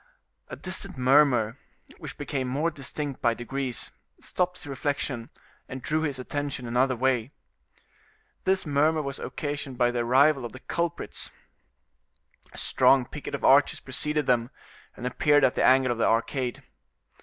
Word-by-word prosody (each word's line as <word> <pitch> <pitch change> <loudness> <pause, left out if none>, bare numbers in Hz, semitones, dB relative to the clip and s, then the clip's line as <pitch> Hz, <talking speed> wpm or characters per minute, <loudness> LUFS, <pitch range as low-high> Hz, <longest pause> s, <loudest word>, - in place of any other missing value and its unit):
A - - -7
distant 185 -2 -4
murmur, 130 -3 +4 0.4
which - - -8
became 130 -3 -3
more 145 +6 0
distinct 145 -1 -5
by 120 -1 +2
degrees, 130 0 -4 0.3
stopped 180 0 -1
this 180 - -9
reflection, 140 -3 -3 0.4
and 130 -1 -7
drew 155 +2 0
his 145 -4 -1
attention 140 0 -4
another 125 +2 +2
way. 125 -1 +1 1.1
This 190 -1 +1
murmur 155 +2 +2
was 140 -1 -5
occasioned 145 -3 -4
by 120 -1 +3
the 120 - -2
arrival 135 +4 +4
of 120 - -6
the 130 - -9
culprits; 170 +4 -3 1.2
a - - -13
strong 135 -2 +4
picket 145 +2 -6
of 140 - -7
archers 140 +2 +5
preceded 150 +3 -2
them, 120 -1 +2 0.5
and 125 - -6
appeared 145 +3 +3
at 125 - +4
the - - 0
angle 130 -1 +5
of 120 - -3
the - - +3
arcade. 120 +2 0
135 Hz, 150 wpm, -27 LUFS, 125-145 Hz, 1.2 s, archers